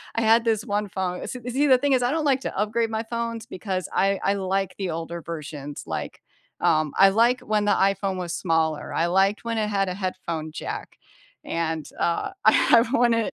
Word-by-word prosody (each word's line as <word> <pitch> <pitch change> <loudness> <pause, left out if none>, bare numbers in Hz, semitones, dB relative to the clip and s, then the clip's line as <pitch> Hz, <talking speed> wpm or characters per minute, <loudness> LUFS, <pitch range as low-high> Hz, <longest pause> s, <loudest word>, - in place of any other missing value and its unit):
I 230 - +1
had 225 +1 +4
this 225 0 0
one 205 -1 -1
phone 180 -1 -3
s - - -5 0.2
see, 275 +4 +1
the 260 -2 +6
thing 280 +1 +1
is 250 -1 +2
I 245 - +1
don't 315 -1 -1
like 270 -2 +2
to - - -5
upgrade 220 +2 0
my 220 0 -2
phones 230 0 -4
because 185 -4 -4
I 195 0 +2
I 195 - +2
like 195 -1 -1
the 190 -3 -3
older 165 +1 -4
versions, 150 -3 -7
like, - - -5 0.4
um, 155 -2 +2
I 195 - +9
like 235 +5 +3
when 210 -1 0
the 205 - +2
iPhone 195 -1 +1
was 175 -2 -4
smaller, 160 -3 0
I 165 - +1
liked 195 +5 +2
when 230 -1 -2
it 215 - 0
had 195 -1 +1
a 185 - -2
headphone 175 -4 -4
jack, 155 - -6 0.5
and, 160 -2 -2
uh, 170 - 0
I 230 +1 +6
wanted 235 -3 +2
195 Hz, 205 wpm, -24 LUFS, 170-230 Hz, 0.5 s, I